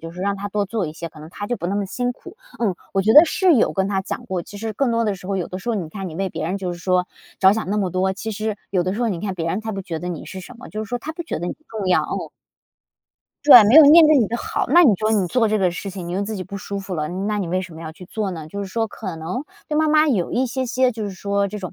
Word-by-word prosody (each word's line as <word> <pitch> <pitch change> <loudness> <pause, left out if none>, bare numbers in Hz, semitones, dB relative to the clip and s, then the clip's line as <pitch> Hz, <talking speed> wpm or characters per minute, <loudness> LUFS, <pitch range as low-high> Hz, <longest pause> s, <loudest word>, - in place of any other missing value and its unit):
就 165 - -8
是 175 +2 -9
让 200 +1 0
他 205 +1 -5
多 205 0 -1
做 205 -3 -2
一 155 - -6
些， 170 +1 -6
可 155 -1 -15
能 155 - -10
她 205 - -6
就 245 - -2
不 175 - -4
那 195 - -1
么 205 -1 -1
辛 245 +5 -2
苦， 360 - -14 0.2
嗯， 210 -6 0 0.2
我 195 - +2
觉 220 +3 +3
得 305 +3 +10
是 370 0 +3
有 235 - +3
跟 190 -1 0
她 195 -1 0
讲 - - -5
过。 185 -2 -2
其 205 - -11
实 220 +1 -4
更 255 +4 0
多 230 0 +1
的 210 -2 0
时 185 -1 -11
候， 195 - 0
有 180 - -2
的 185 - -6
时 190 - -8
候 235 - +1
你 175 -6 -4
看 190 +3 -6
你 160 - -9
为 195 +1 -1
别 - - -5
人 185 +4 -2
就 185 -2 -3
是 175 - -8
说 180 0 +1 0.3
着 190 0 +6
想 220 -2 -3
那 210 - 0
么 195 -3 0
多， 190 +2 0
其 220 +3 -5
实 215 0 -3
有 185 -3 +1
的 185 +1 -1
时 220 - -4
候 240 - +1
你 180 -6 -3
看 195 -1 -3
别 165 -2 -3
人 185 +5 -1
他 220 0 -5
不 195 - -4
觉 165 -3 -5
得 180 - -4
你 175 -3 -5
是 190 - -8
什 245 +7 -12
么， 255 - -11
就 215 - -5
是 - - -13
说 245 - -2
他 315 +5 -6
不 345 - -6
觉 330 - -4
得 175 - -4
你 - - -3
重 215 -4 -4
要， 180 - +4
嗯。 - - -4 1.2
对， 250 -6 +11
没 220 +8 +5
有 320 - +12
念 315 +3 +9
对 305 0 +6
你 230 - +3
的 235 - -2
好， - - -2
那 340 +7 +7
你 270 -10 +6
说 215 +3 0
你 200 -4 +2
做 235 +4 +2
这 215 0 +1
个 185 -3 +2
事 190 +3 -6
情， 185 -3 -7
你 175 - -4
又 195 - -1
自 215 +2 -4
己 190 - -4
不 200 +2 -7
舒 200 +1 -5
服 190 -1 -6
了， 150 -1 -1
那 200 +4 -2
你 195 - -2
为 185 +2 -1
什 180 - -9
么 160 - -10
要 160 -1 -7
去 180 - -12
做 200 +1 -3
呢。 160 -3 -7
就 200 - -7
是 200 - -4
说 225 +4 -1
可 195 -4 -6
能 165 - -4 0.2
对 300 - 0
妈 315 - +3
妈 305 0 +4
有 200 -11 0
一 255 - +1
些 260 +1 -2
些， 255 +1 +2
就 220 -2 -5
是 200 - -4
说 200 +1 -1
这 205 +2 -6
种， 185 -3 -6
200 Hz, 365 characters per minute, -21 LUFS, 185-230 Hz, 1.2 s, 有